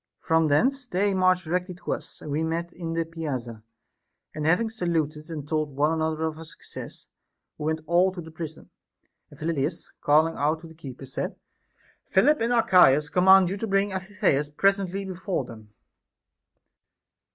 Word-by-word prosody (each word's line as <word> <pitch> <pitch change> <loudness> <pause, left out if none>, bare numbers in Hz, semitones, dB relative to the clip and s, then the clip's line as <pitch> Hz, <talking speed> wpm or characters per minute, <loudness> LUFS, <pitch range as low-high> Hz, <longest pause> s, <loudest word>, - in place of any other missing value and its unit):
33. - - -25
From 160 -1 +4
thence 255 - +2
they 200 -1 +1
marched 185 -1 +3
directly 180 +2 -2
to 180 - -6
us, - - -6
and 150 - -7
we 150 +2 0
met 165 +2 -2
in 165 -2 -5
the 165 0 0
piazza; 135 -9 -5 0.7
and 155 0 -2
having 180 +8 +3
saluted 165 -7 -2
and 150 -3 -6
told 155 -2 -1
one 150 +3 +2
another 160 0 -1
our 160 0 -3
success, 160 - -11 0.5
we 150 - -4
went 160 0 -1
all 175 +3 +3
to 185 - -9
the 160 -1 -8
prison. 160 -1 -8 0.6
And - - -16
Phyllidas, 160 0 -2
calling 155 +3 +4
out 155 +3 0
the 160 - -13
keeper, 135 -4 -9
said: 135 - -4 0.7
Philip 300 -4 +3
and 230 +1 +1
Archias 160 - +5
command 185 0 +6
you 195 - -2
to 225 - -3
bring 195 0 +1
Amphitheus 185 -6 0
presently 195 +4 +1
before 185 -5 -3
them. 110 -3 -12
165 Hz, 165 wpm, -26 LUFS, 155-185 Hz, 0.7 s, command